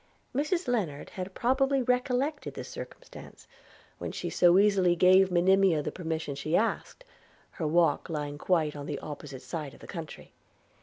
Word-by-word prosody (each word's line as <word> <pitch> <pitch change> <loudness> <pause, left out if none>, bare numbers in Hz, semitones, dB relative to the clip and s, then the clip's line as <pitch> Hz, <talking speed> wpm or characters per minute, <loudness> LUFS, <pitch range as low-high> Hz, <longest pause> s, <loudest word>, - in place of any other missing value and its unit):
Mrs 310 +7 0
Lennard 195 -13 -2
had 185 0 -6
probably 270 +2 +2
recollected 250 +4 -1
this - - -7
circumstance - - -10 0.5
when - - -4
she - - -4
so 175 0 +5
easily 195 -3 +4
gave 185 +2 +5
Monimia 180 -2 +3
the - - -3
permission 160 -4 -4
she 155 +4 0
asked, 230 - -2 0.5
her 160 - -3
walk 170 +3 +2
lying 145 -2 -4
quite 160 -5 +1
on 145 0 -7
the 145 - -3
opposite 145 -3 -8
side 155 -5 -6
of - - -18
the - - -12
country. 165 -5 -8
180 Hz, 155 wpm, -29 LUFS, 155-240 Hz, 0.5 s, so